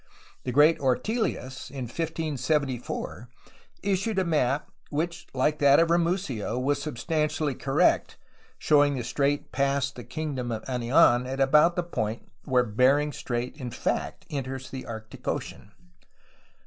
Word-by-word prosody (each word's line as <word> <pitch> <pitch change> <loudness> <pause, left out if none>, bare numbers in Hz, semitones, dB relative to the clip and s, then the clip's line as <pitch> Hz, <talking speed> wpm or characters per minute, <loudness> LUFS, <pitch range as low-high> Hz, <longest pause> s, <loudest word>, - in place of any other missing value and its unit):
The 125 - -1
great 150 +5 +5
OrteUus, 130 - -1
in 135 -1 -5
1574, 145 -4 -2 0.5
issued 200 +2 0
a 190 - +2
map 145 -4 0 0.2
which, 170 +3 -3
like 150 +4 +1
that 140 0 +6
of 165 0 +3
Ramusio, 170 - 0
was 140 +2 0
substantially 150 +1 -1
correct, 135 +2 +1 0.4
showing 145 -1 +4
the 125 - -3
strait 140 +4 -1
past 140 0 0
the 120 - -8
kingdom 130 -2 -4
of 110 -1 -4
Anian 125 0 +3
at 135 +1 -4
about 150 +5 +5
the 175 - 0
point 115 -9 -3 0.2
where 125 -1 +3
Bering 130 +6 +3
Strait 125 -2 -4
in 130 -4 -5
fact - - -3
enters 130 -2 -4
the 130 -1 -7
Arctic 110 -1 -9
Ocean. 100 - -4
140 Hz, 135 wpm, -27 LUFS, 125-155 Hz, 0.5 s, that